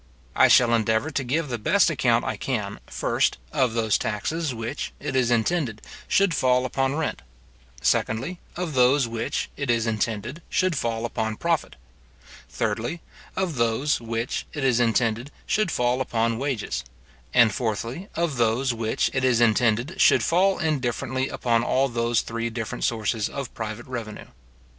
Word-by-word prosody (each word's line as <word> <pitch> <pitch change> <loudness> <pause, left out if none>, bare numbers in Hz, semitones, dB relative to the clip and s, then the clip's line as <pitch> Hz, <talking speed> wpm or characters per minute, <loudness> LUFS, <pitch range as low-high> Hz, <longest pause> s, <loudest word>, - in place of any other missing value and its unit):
I - - +6
shall 120 -1 +5
endeavour 115 +6 +1
to 140 - -1
give 150 +5 -1
the 120 -2 -3
best - - +3
account - - +2
I - - -1
can, - - -3
first, - - 0
of 125 -3 +1
those 110 -2 +2
taxes 150 +9 -2
which, 120 +4 -5
it 135 - -4
is 125 -2 +3
intended 120 0 +1 0.3
should 195 -3 +3
fall 125 -3 +2
upon 135 +2 0
rent; 160 0 -2 0.6
secondly, 135 +11 0 0.2
of 175 -3 -3
those 130 +1 +4
which, 115 0 -3
it 145 -3 -4
is 115 -1 +2
intended 115 +6 -2
should 185 -3 +1
fall 115 -3 -1
upon 110 -2 -2
profit; 170 +4 -1 0.7
thirdly, 120 +10 -2 0.4
of 185 -7 -1
those 115 +5 +1
which, 115 +1 -3
it 145 - -4
is 125 -3 +3
intended 115 +1 +1 0.2
should 215 -3 +1
fall 125 -2 +1
upon 115 -2 0
wages; 135 -5 -2 0.5
and 120 -4 +5
fourthly, 115 - -3
of 165 -5 -1
those 120 +3 +2
which, 115 -1 0
it 130 - 0
is 125 -3 +3
intended 120 - +2
should - - +5
fall 190 +3 +3
indifferently 130 -3 -1
upon 115 -1 +1
all 135 +2 +2
those 120 -1 +1
three 115 0 -3
different 115 -1 -5
sources 110 -1 0
of 140 -3 -6
private 110 +1 -5
revenue. 115 -4 -6
120 Hz, 155 wpm, -25 LUFS, 115-140 Hz, 0.7 s, I